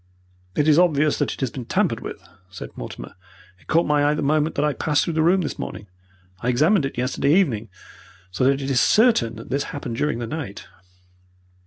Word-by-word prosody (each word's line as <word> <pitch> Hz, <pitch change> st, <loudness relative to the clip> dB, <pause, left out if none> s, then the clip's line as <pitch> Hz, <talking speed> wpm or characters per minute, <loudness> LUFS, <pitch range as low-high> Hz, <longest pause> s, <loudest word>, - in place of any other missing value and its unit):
"It 150 Hz, -, +1 dB
is 155 Hz, +1 st, +5 dB
obvious 155 Hz, -4 st, +2 dB
that -, -, 0 dB
it -, -, -8 dB
has 130 Hz, -3 st, -1 dB
been 125 Hz, -3 st, -7 dB
tampered -, -, 0 dB
with," -, -, -7 dB, 0.3 s
said 90 Hz, -, -9 dB
Mortimer. -, -, -8 dB, 0.5 s
"It -, -, -25 dB
caught 165 Hz, +2 st, +3 dB
my 150 Hz, -1 st, +2 dB
eye 145 Hz, +1 st, +2 dB
the -, -, -2 dB
moment 155 Hz, +2 st, +1 dB
that 145 Hz, -, +1 dB
I 150 Hz, -, +1 dB
passed 150 Hz, 0 st, +1 dB
through 170 Hz, -, -2 dB
the 160 Hz, -, +1 dB
room 180 Hz, +4 st, +3 dB
this 155 Hz, -, -4 dB
morning. 105 Hz, -, -6 dB, 0.5 s
I 120 Hz, -, -2 dB
examined 150 Hz, -, +3 dB
it 135 Hz, -, -11 dB
yesterday 135 Hz, +4 st, +1 dB
evening, 120 Hz, -, +1 dB, 0.6 s
so 95 Hz, -, -2 dB
that 135 Hz, +1 st, +2 dB
it 135 Hz, -, -2 dB
is 130 Hz, -, +3 dB
certain 215 Hz, -, +3 dB
that 115 Hz, -, -10 dB
this 140 Hz, +1 st, 0 dB
has -, -, -8 dB
happened 120 Hz, -5 st, -5 dB
during 150 Hz, -3 st, 0 dB
the 120 Hz, -, -4 dB
night." 135 Hz, -6 st, -6 dB
145 Hz, 215 wpm, -22 LUFS, 125-155 Hz, 0.6 s, is